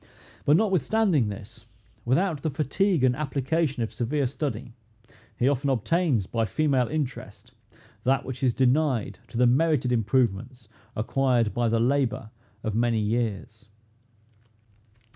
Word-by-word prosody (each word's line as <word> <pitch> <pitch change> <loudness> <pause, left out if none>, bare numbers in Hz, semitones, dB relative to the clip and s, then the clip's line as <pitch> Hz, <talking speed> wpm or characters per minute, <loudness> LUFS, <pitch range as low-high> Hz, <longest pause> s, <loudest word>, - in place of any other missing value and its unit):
But 145 +2 +5
notwithstanding 190 - +2
this, 115 +3 -10 0.4
without 155 +5 +1
the 160 - -1
fatigue 155 +3 0
and 125 -1 +3
application 140 -1 -1
of 110 - -5
severe 135 +4 -1
study, 125 -3 -4 0.6
he 125 - +2
often 140 0 +1
obtains, 135 - +1
by 115 +3 -1
female 135 +1 +1
interest, 145 -3 -5 0.5
that 135 +1 +1
which 130 -1 -6
is 125 -3 +1
denied 130 -6 +1
to - - -8
the 125 - +4
merited 130 0 +2
improvements 120 0 0 0.3
acquired 120 0 +1
by 120 -1 +1
the 115 0 +1
labor 125 -3 0 0.3
of 110 - -2
many 115 +1 +1
years. 110 -1 -3
130 Hz, 125 wpm, -26 LUFS, 115-145 Hz, 0.6 s, But